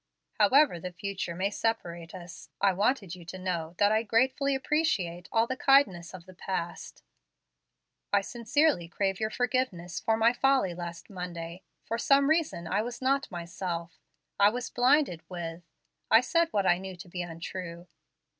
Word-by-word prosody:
"However 215 - +5
the 180 +2 -6
future 185 -1 -4
may 195 +3 -1
separate 175 -7 -3
us, 175 -1 -10
I 195 -1 +3
wanted 200 -1 0
you 180 -1 -9
to 185 +2 -7
know 175 -3 -3
that 205 0 +4
I 220 0 +3
gratefully 260 +5 +2
appreciate 260 - -1
all 225 0 +3
the 260 - -3
kindness 195 -12 +3
of 170 -2 -11
the 185 - -13
past. 175 -2 -5 1.1
I 200 - +4
sincerely 240 - +1
crave 195 +2 -1
your 215 0 0
forgiveness 235 -9 -1
for 225 0 +1
my 230 +2 +4
folly 265 -7 +2
last 170 +2 -8
Monday. 175 -1 -6 0.2
For 230 - -2
some 275 +3 +4
reason 315 - 0
I 200 +5 0
was 240 +2 -5
not 275 +2 +1
myself. 170 -1 -5 0.4
I 200 +1 +7
was 245 +3 -4
blinded 250 - +3
with 170 -2 -6 0.5
I 225 - +7
said 335 +6 +2
what 200 -10 0
I 175 -1 +4
knew 190 0 -7
to 180 +2 -11
be 180 +1 -5
untrue. 170 0 -7
195 Hz, 165 wpm, -29 LUFS, 175-245 Hz, 1.1 s, I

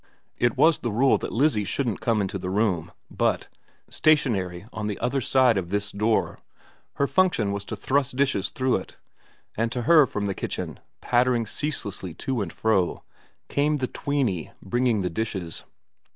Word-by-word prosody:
It 120 -1 +2
was 165 -1 +5
the 120 - -2
rule 130 +6 +3
that - - -5
lizzie 125 -4 +2
shouldn't 115 +3 -2
come 115 -3 +1
into 100 +1 -3
the 90 - -4
room, 95 -4 0 0.2
but, - - 0 0.4
stationary 100 - +1
on 105 -1 -3
the 105 - -3
other 130 +3 -1
side 125 -4 +4
of 85 -2 -6
this 100 +1 -2
door, 110 +2 0 0.5
her 140 - +1
function 165 - +2
was 100 0 -3
to - - -5
thrust 135 -1 0
dishes 130 -8 +1
through 130 -1 +1
it; 95 - -10 0.6
and 115 +1 0
to 125 -1 -2
her 155 +1 +6
from 105 -3 -3
the 100 - -1
kitchen, - - -5 0.2
pattering 120 -1 +2
ceaselessly 100 - -4
to 130 +2 -2
and 100 - -3
fro, 100 -6 0 0.4
came 150 +1 +1
the 130 - -1
tweeny 125 - -1
bringing 120 0 0
the 90 - 0
dishes. 95 -4 -4
115 Hz, 165 wpm, -25 LUFS, 100-135 Hz, 0.6 s, her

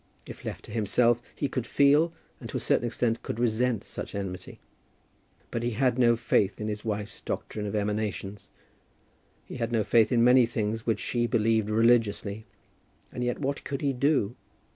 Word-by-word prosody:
If - - -10
left - - -6
to - - -11
himself 115 +2 +2
he 145 - -1
could 130 -3 -3
feel 145 +4 +4 0.3
and - - -8
to - - -3
a - - -2
certain 120 - +1
extent 115 0 -1
could 115 - -5
resent 120 -1 +1
such - - -7
enmity. 95 -2 -6 0.9
But 115 - -2
he 120 0 -1
had 130 -1 +2
no 120 -1 +5
faith 105 -3 +1
in 105 - -3
his 105 0 -4
wife's 105 -2 -4
doctrine 105 -1 -4
of 100 - -3
emanations. 105 -1 -3 1.0
He - - -8
had 115 -1 -2
no 115 -2 +2
faith 115 +3 +3
in 120 -2 +4
many 125 0 +6
things 110 0 -3
which 110 -3 +1
she 120 -1 -1
believed 110 -2 +1
religiously; 110 -2 +2 0.6
and 125 - -4
yet 120 0 -1
what 140 0 -2
could 140 -1 -4
he 140 -1 +1
do? 125 -4 +1
115 Hz, 180 wpm, -27 LUFS, 105-125 Hz, 1.0 s, many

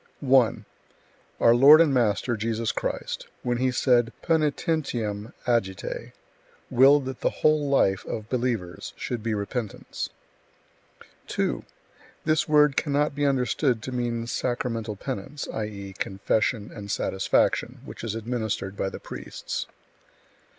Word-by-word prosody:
1. 130 -4 +3 0.7
Our 115 - +6
Lord 140 +6 +9
and 160 -4 +4
Master 120 0 +1
Jesus 115 +1 -1
Christ, - - -4 0.2
when 120 -1 0
He 130 +1 +2
said 120 -2 +3
Poenitentiam 145 -9 0
agite, 105 -7 -1 0.6
willed 135 +2 +6
that 130 -1 -5
the - - +2
whole 155 -2 +2
life 95 -8 +3
of 110 -1 -4
believers 115 -8 -2
should 120 -2 -4
be 115 0 -1
repentance. 105 +1 -4 1.2
2. - - -1 0.6
This 155 0 +2
word 150 -2 +5
cannot 145 0 +1
be 145 0 +1
understood 125 -2 +1
to 130 - -5
mean 120 -2 -2
sacramental 115 -3 -2
penance, 135 +9 -5
i.e., 100 -3 -5
confession 105 +2 0
and 105 -2 -8
satisfaction, 95 -1 +1
which - - -9
is 110 -2 -3
administered 110 -4 -3
by 95 - -1
the - - -8
priests. - - -6
120 Hz, 120 wpm, -26 LUFS, 110-135 Hz, 1.2 s, Lord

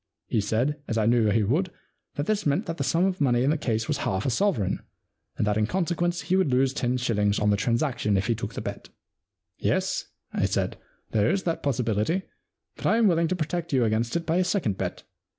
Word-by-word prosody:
He 110 - +2
said, 125 +9 0
as 115 - -1
I 110 - +2
knew 115 -1 +4
he 110 +1 +2
would, 155 - +1 0.5
that 145 - -2
this 215 +2 0
meant 140 0 +1
that 165 0 -4
the - - -1
sum 170 +2 +2
of 190 -3 -1
money 125 -3 +3
in 140 - +3
the - - +2
case 110 -4 -1
was - - 0
half 95 0 -1
a 130 - +1
sovereign, 120 - +1 0.6
and - - +1
that 105 0 +1
in 105 -1 +2
consequence 175 +1 0
he 185 - 0
would 190 -5 +3
lose 130 +1 +3
ten 125 -3 0
shillings 105 -4 +1
on 105 0 +2
the - - +4
transaction 115 -1 +1
if 95 - 0
he 115 - +2
took 105 -2 -5
the - - -3
bet. - - -6 0.4
* - - -62 0.3
Yes,'* - - 0 0.3
I - - +1
said, - - -1 0.2
" - - -40
there 105 0 +2
is 195 0 0
that 165 -2 -1
possibility, 125 - 0 0.5
but - - -2
I 225 - +4
am 230 - +4
willing 170 -2 +3
to 185 - 0
protect 170 0 -3
you 125 -3 +4
against 115 +2 0
it 170 0 -1
by 165 +2 +1
a 185 - +3
second 180 - 0
bet. - - -4
130 Hz, 240 wpm, -26 LUFS, 110-170 Hz, 0.6 s, knew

